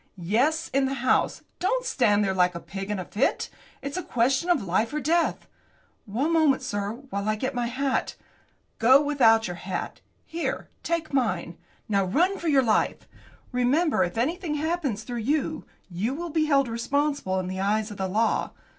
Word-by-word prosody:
"Yes, 250 - +1
in 275 0 +3
the 270 +1 -1
house. 255 0 +1 0.2
Don't - - 0
stand 210 - +3
there 195 -1 0
like 180 -1 +2
a - - -3
pig 195 +3 -7
in 210 - -1
a 185 - -4
fit. 220 +9 0 0.3
It's 280 +5 -4
a - - -1
question 265 +8 +1
of 325 -10 +3
life 200 +5 0
or - - 0
death!" 330 +4 +1 0.6
"One 265 +11 0
moment, 300 -5 +3
sir, 205 -4 -2 0.2
while 200 +1 -2
I 215 - +2
get 260 +5 -3
my 245 -1 -1
hat." 265 +2 -1 0.6
"Go 255 +4 +7
without 260 -7 +4
your 175 -1 -5
hat. 185 +1 -5 0.2
Here; 335 +1 -3
take 335 -3 -2
mine. 185 -10 0 0.3
Now, 200 -2 +2
run 350 - +1
for 340 - -4
your 280 -4 +4
life. 220 -3 +1 0.4
Remember, 250 - +2
if 175 +4 -3
anything 320 +6 -1
happens 300 -8 -1
through 240 0 -5
you, 295 +6 -1 0.2
you 200 +9 -2
will 340 +1 -5
be 310 0 +2
held 275 -3 +3
responsible 235 -3 -1
in 185 - -3
the 185 +1 -4
eyes 210 +2 0
of 205 - -8
the 190 - -1
law. 220 +4 0
250 Hz, 180 wpm, -26 LUFS, 205-300 Hz, 0.6 s, Go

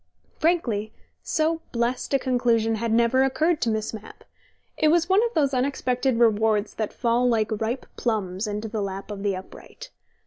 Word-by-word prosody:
Frankly, 235 -11 0 0.3
so 320 +1 0
blest 240 +1 -1
a 275 - +4
conclusion 240 -4 +1
had 225 +1 -2
never 235 +3 +3
occurred 295 +5 +1
to 235 - +1
Miss 220 0 -2
Mapp: 220 -1 -10 0.5
it 310 - +2
was 335 +1 +3
one 390 +4 +4
of 475 - -4
those 280 -3 +2
unexpected 255 -1 0
rewards 220 -2 +2
that 215 -2 -3
fall 240 +1 +1
like 225 -2 +1
ripe 235 +4 -2
plums 205 -3 -2
into 210 +1 -3
the 215 -1 -3
lap 195 +1 -5
of 200 -1 -6
the 200 -1 0
upright. 475 - -11
235 Hz, 170 wpm, -24 LUFS, 215-270 Hz, 0.5 s, a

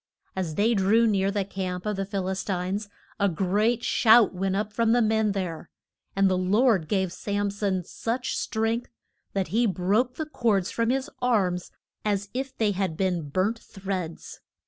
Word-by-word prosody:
As 175 -5 -3
they 220 +6 +3
drew 215 +3 +4
near 195 -3 +2
the 200 -1 -1
camp 185 -1 -4
of 210 -1 -1
the 195 0 -3
Phil 195 -2 -2
is 190 0 -2
tines 195 +2 -2 0.3
a 200 -1 +3
great 205 +7 +1
shout 225 -2 +5
went 190 +1 -1
up 210 +1 -2
from 230 +1 +2
the 240 - +4
men 220 -1 +2
there. 175 -4 -4 0.5
And 195 0 +4
the 185 -1 +1
Lord 200 -1 +3
gave 190 -2 0
Sam 205 +1 -2
son 195 -2 -1
such 235 +8 -3
strength 225 +2 -1 0.4
that 195 -4 -1
he 230 +6 +2
broke 205 +7 +1
the 315 - -3
cords 220 -11 0
from 230 0 0
his 265 +2 0
arms 190 -8 +1 0.3
as 205 -1 -1
if 265 +1 -4
they 215 -2 +2
had 185 -4 -2
been 180 -6 -1
burnt 195 +9 0
threads. 190 -4 -6
200 Hz, 175 wpm, -26 LUFS, 185-225 Hz, 0.5 s, shout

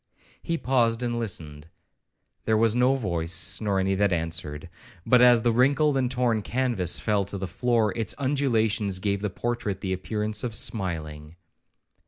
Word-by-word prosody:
He 165 -1 -2
paused 120 -4 +1
and 120 -1 -1
listened:—'There 85 +3 -6
was 110 0 +3
no 125 +2 +3
voice, 90 -4 -2
nor 100 -3 0
any 95 0 +1
that 100 0 +1
answered;'—but 85 - -2
as 120 -2 +6
the 120 - +3
wrinkled 140 +5 +3
and 130 -2 +1
torn 125 -3 0
canvas 115 -6 -1
fell 105 -2 0
to 100 +1 -5
the 95 0 -4
floor, 115 0 0
its 115 -2 -2
undulations 115 -8 +1
gave 100 +1 -1
the 105 - -1
portrait 105 -1 -3
the 95 -1 -2
appearance 105 +3 -2
of 120 -3 -2
smiling. 80 -7 -3
105 Hz, 150 wpm, -25 LUFS, 95-120 Hz, -, as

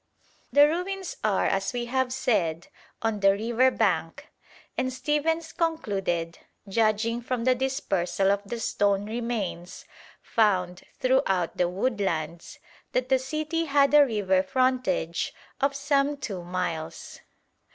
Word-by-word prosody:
The 285 +3 +7
ruins 360 +3 -3
are, 210 -3 +2
as 195 +3 0
we 240 -1 -2
have 260 +1 0
said, 180 -11 0 0.3
on 225 -2 0
the 195 0 +5
river 235 +5 +2
bank, - - -1 0.5
and 255 - -1
Stephens 310 +4 -1
concluded, 195 - -1 0.3
judging 225 +3 +1
from 245 -1 -2
the 255 +1 +4
dispersal 195 -8 0
of 200 0 +1
the 230 +4 -5
stone 200 -2 +1
remains 215 -6 -4 0.4
found 185 -5 +1 0.2
throughout 255 - +1
the 175 -1 +1
woodlands, 180 -6 -2 0.4
that 255 0 0
the 265 -1 +4
city 310 +5 -2
had 280 -1 +3
a 295 -1 +9
river 205 -7 +1
frontage 255 -8 0 0.2
of 275 0 +1
some 280 0 +1
two 210 -10 -5
miles. 175 -3 -4
230 Hz, 125 wpm, -26 LUFS, 190-265 Hz, 0.5 s, a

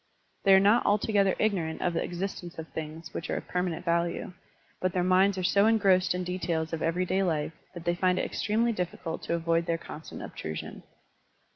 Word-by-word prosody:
They 195 -1 +8
are - - +7
not 205 +5 +4
altogether 205 -2 +2
ignorant 180 -7 0
of 175 - +1
the 165 - 0
existence 175 -1 -5
of 160 0 -6
things 160 +1 -7
which 165 - -5
are - - 0
of - - -7
permanent 180 -1 -2
value, 170 +2 0 0.5
but 185 -1 0
their 180 - +1
minds 190 +2 +4
are 185 - -2
so 200 +3 +4
engrossed 190 -5 +3
in 180 - -2
details 170 -3 -2
of 165 - -2
everyday 180 +3 +1
life 160 -4 0 0.2
that 175 0 -8
they 175 - +2
find 180 +1 +2
it - - 0
extremely 230 +3 0
diffi 180 -4 -3
cult 165 0 -4
to 170 - 0
avoid 165 0 0
their 165 -1 +1
constant 160 -1 -9
obtrusion. 80 0 -6
180 Hz, 195 wpm, -28 LUFS, 165-190 Hz, 0.5 s, They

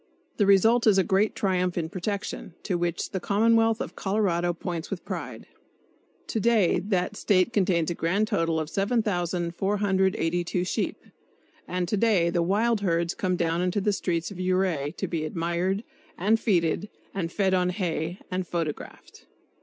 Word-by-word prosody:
The 205 - +3
result 225 +5 +5
is 205 -3 +6
a 190 - +5
great 195 +4 +1
triumph 180 -2 0
in 165 -2 -1
protection, 190 -1 -4
to 185 - -1
which 175 -1 -2
the 190 - -2
commonwealth 225 +3 +3
of - - -5
Colorado 190 -4 0
points 170 -1 -5
with 195 - -5
pride. - - -6 0.8
To 225 - -2
day 220 -4 +3
that 190 -1 -1
State 200 +2 +2
contains 180 -5 +2
a - - 0
grand 190 +6 0
total 165 -4 0
of 155 - -3
7,482 190 -3 0
sheep; - - -3 0.6
and 180 -1 -2
to 210 - 0
day 195 -6 +3
the 170 - +1
wild 210 +5 +1
herds 170 -3 0
come 185 -5 -1
down 170 0 0
into 180 +2 0
the 205 +1 +1
streets 170 -2 -2
of 190 - -9
Ouray 185 -6 0
to - - -2
be 165 -3 -2
admired, 175 +5 -1 0.3
and 215 +5 +2
feted, 180 -1 +1 0.2
and 170 -4 -3
fed 190 0 +1
on 180 -1 +2
hay 175 -2 -2
and 185 -1 -2
photographed. 165 -4 -5
185 Hz, 160 wpm, -26 LUFS, 170-205 Hz, 0.8 s, is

